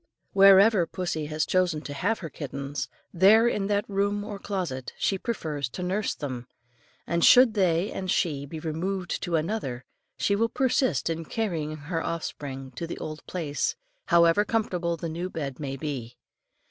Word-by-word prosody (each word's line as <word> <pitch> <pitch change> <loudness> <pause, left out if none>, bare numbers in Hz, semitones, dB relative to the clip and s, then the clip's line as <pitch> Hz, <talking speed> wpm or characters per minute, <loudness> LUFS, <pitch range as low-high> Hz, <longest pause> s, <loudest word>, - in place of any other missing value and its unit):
Wherever 195 -1 +7
pussy 175 -5 -3
has 155 +1 -1
chosen 180 -4 +1
to 145 - -6
have 205 +10 0
her - - -5
kittens, 140 0 -5 0.2
there 205 +6 +6
in 205 -4 0
that 205 0 0
room 200 +1 0
or 205 -1 -6
closet 175 -12 -4
she 195 - 0
prefers 150 - -3
to 180 - -6
nurse 195 +4 -1
them, 130 -4 -5 0.6
and 170 -1 0
should 250 -2 +8
they 185 -2 +2
and 185 -1 -4
she 145 -6 0
be 160 +2 -6
removed 175 +4 -3
to 175 - -1
another 155 - -2 0.3
she 200 - +2
will 230 +3 +1
persist 260 +1 +1
in 165 0 -2
carrying 165 -8 -2
her 165 +3 -3
offspring 135 -5 -5
back 125 - -25
to 170 - -3
the - - -5
old 155 0 -6
place, 155 -5 -2 0.3
however 170 +3 +5
comfortable 180 -6 -1
the 165 - -4
new 170 +3 -4
bed 140 -7 -5
may 135 -2 -4
be. 130 -5 -5
170 Hz, 170 wpm, -27 LUFS, 150-200 Hz, 0.6 s, should